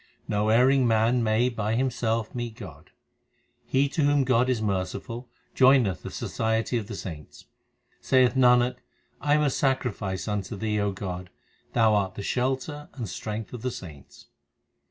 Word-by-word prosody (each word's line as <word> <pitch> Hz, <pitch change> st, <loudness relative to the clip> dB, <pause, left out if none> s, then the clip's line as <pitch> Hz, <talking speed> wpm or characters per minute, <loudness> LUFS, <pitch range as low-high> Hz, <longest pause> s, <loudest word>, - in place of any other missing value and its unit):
No 105 Hz, +1 st, 0 dB
erring 130 Hz, +3 st, +4 dB
man 115 Hz, +2 st, +3 dB
may 110 Hz, +2 st, +2 dB
by 110 Hz, -3 st, -1 dB
himself 115 Hz, -3 st, -1 dB
meet 120 Hz, -2 st, -4 dB
God. 110 Hz, -5 st, -11 dB, 0.8 s
He 135 Hz, +2 st, +2 dB
to 155 Hz, -, -1 dB
whom 145 Hz, -1 st, +3 dB
God 125 Hz, 0 st, +2 dB
is 125 Hz, -3 st, +1 dB
merciful 110 Hz, +4 st, -3 dB, 0.3 s
joineth 130 Hz, -8 st, +4 dB
the -, -, -7 dB
society 110 Hz, +2 st, -1 dB
of 105 Hz, -, -7 dB
the 105 Hz, -, -6 dB
saints. 80 Hz, -7 st, -9 dB, 0.5 s
Saith 130 Hz, -2 st, +3 dB
Nanak, 125 Hz, -1 st, +4 dB, 0.4 s
I 145 Hz, 0 st, +3 dB
am 150 Hz, -, +2 dB
a 145 Hz, -, +2 dB
sacrifice 120 Hz, -10 st, -1 dB
unto 105 Hz, 0 st, -3 dB
Thee, 105 Hz, +1 st, -1 dB
O 100 Hz, -1 st, 0 dB
God; 90 Hz, -2 st, -6 dB, 0.4 s
Thou 110 Hz, -2 st, +4 dB
art 95 Hz, -2 st, 0 dB
the 100 Hz, -, -6 dB
shelter 135 Hz, +6 st, -2 dB
and 120 Hz, -5 st, -4 dB
strength 105 Hz, +5 st, -5 dB
of 120 Hz, -, -6 dB
the 130 Hz, -, -1 dB
saints. 80 Hz, -, -11 dB
115 Hz, 155 wpm, -26 LUFS, 105-130 Hz, 0.8 s, erring